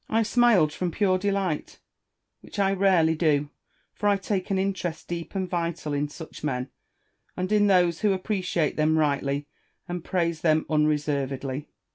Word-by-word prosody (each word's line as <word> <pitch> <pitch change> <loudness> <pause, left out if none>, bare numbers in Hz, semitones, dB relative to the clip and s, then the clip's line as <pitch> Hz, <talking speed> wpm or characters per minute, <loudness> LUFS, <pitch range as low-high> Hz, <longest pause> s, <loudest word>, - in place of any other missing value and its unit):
I 225 +1 +2
smiled 215 -9 +4
from 180 +2 -2
pure 185 +1 +1
delight, 195 -5 -2 0.6
which - - -12
I 195 -1 +2
rarely 185 -5 +3
do; 150 -3 +1 0.4
for 205 - 0
I 200 - +3
take 195 -1 -2
an 195 - +1
interest 190 -4 -2
deep 170 +2 -5
and 190 -1 -1
vital 170 -4 -2
in 145 +1 -1
such 160 0 -10
men, 125 -3 -2 0.7
and 185 +2 -2
in 205 -1 +4
those 175 -3 +3
who 210 -2 +2
appreciate 185 -5 -1
them 155 +1 +3
rightly 140 -1 0 0.4
and 175 -1 -4
praise 170 -3 -1
them 155 -2 +2
unre 150 0 +3
servedly. 140 -1 -3
170 Hz, 160 wpm, -26 LUFS, 150-195 Hz, 0.7 s, smiled